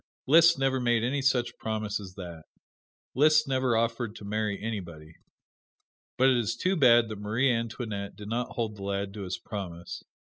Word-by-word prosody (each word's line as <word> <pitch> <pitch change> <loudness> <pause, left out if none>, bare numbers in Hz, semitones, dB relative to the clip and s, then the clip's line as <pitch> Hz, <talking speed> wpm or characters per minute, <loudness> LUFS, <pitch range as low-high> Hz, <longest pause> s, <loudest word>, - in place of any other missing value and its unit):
Liszt 165 +4 +6
never 135 -1 +1
made 120 -2 +1
any 135 +4 0
such 130 -3 0
promise 110 -2 -2
as 95 -2 -10
that. 85 -4 -9 0.7
Liszt 155 +3 +4
never 130 -3 +1
offered 115 -1 -1
to 105 - -10
marry 105 0 -2
anybody. 85 -8 -6 1.0
But 130 +1 +5
it 125 - +3
is 115 -1 -1
too 185 +10 0
bad 120 -7 +5
that 110 -2 -6
Marie 115 +6 +1
Antoinette 115 -3 -4
did 105 - -10
not 120 +2 -3
hold 110 -3 -3
the 100 - -9
lad 100 0 -3
to 105 - -7
his 90 -1 -4
promise. 85 -4 -7
115 Hz, 175 wpm, -28 LUFS, 100-125 Hz, 1.0 s, Liszt